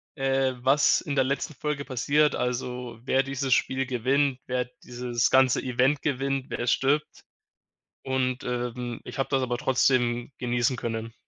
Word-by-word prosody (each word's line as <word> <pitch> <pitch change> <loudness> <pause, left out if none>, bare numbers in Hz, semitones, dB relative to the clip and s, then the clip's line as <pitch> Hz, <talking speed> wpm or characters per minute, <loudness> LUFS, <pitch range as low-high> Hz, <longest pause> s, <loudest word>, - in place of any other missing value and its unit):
äh, 135 -1 +1
was 135 +3 +4
in 140 - -4
der 135 - +4
letzten 140 +3 -2
Folge 145 0 -3
passiert, 140 +3 +2
also, 125 -1 -3
wer 135 0 +2
dieses 135 -1 -1
Spiel 130 0 +1
gewinnt, 130 +2 +1
wer 125 -1 0 0.2
dieses 120 -1 -1
ganze 130 -1 +4
Event 130 +3 +1
gewinnt, 135 -1 -1
wer - - -4
jetzt 120 0 +2
stirbt. 145 +3 0 0.8
Und, 130 -1 -1
ähm, 125 -1 -3
ich - - -9
habe 135 - 0
das 135 -1 +1
aber 120 -1 -1
trotzdem 120 -1 +1
genießen 120 +1 +1
können. 115 0 -4
130 Hz, 155 wpm, -26 LUFS, 125-135 Hz, 0.8 s, was